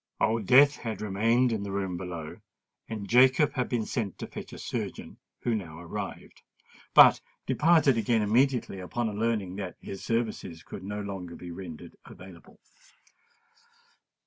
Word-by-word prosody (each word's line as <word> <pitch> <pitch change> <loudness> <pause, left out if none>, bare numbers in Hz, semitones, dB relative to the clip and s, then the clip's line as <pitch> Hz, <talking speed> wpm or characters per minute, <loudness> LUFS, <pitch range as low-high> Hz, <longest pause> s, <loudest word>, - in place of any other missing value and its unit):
Old 110 -2 +1
Death 140 +3 +6
had 110 -2 -5
remained 115 +5 +2
in 110 -3 -1
the 100 -1 -5
room 95 -2 -2
below; 85 -3 -6 0.5
and 105 -3 -5
Jacob 130 +5 +5
had 125 -2 -2
been 115 -3 -1
sent 105 -6 -3
to - - -5
fetch - - -9
a - - -9
surgeon, - - -5 0.2
who 120 - 0
now 85 -8 -4
arrived, 85 -1 -7 0.5
but - - +8 0.2
departed 150 -2 +4
again 110 0 +2
immediately 120 -1 +1
upon 110 +4 -3
learning 105 -5 -1
that 95 -3 -5
his 95 - -8
services 110 -8 -2
could 95 - -9
no 105 +2 -4
longer 95 -4 -6
be 90 - -9
rendered 85 -3 -9
available. 90 -1 -14
105 Hz, 145 wpm, -28 LUFS, 95-120 Hz, 0.5 s, but